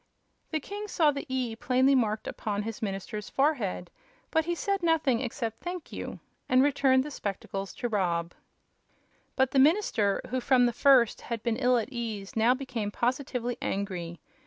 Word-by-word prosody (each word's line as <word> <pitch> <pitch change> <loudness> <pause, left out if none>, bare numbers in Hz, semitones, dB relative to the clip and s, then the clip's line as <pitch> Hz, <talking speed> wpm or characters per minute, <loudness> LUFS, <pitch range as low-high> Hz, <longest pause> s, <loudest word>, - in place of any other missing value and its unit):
The 315 - -1
king 410 +7 -6
saw 320 -6 +3
the 280 -1 -6
"E" 255 -3 -1
plainly 255 +3 +3
marked 220 -4 +1
upon 205 -1 -3
his 225 +2 -6
minister's 205 0 -4
forehead, 245 - 0 0.4
but 320 -1 +2
he 345 0 -1
said 395 +2 -1
nothing 315 -8 +2
except 230 -3 -4
"Thank 355 -2 -6
you," - - -6 0.3
and 255 +1 +5
returned 275 -2 +3
the 300 - -7
spectacles 195 -4 -4
to 240 - -2
Rob. 175 -6 -1 1.0
But 265 -1 +2
the 270 - +3
minister, 265 - +3
who 255 0 0
from 250 -1 +4
the 240 - +1
first 250 -2 +4
had 230 -2 -5
been 235 -2 0
ill 250 -1 +3
at 230 +1 -2
ease, 220 -5 -5
now 230 +3 +4
became 250 -6 -4
positively 245 +1 -2
angry. 180 -4 -3
245 Hz, 165 wpm, -28 LUFS, 215-275 Hz, 1.0 s, and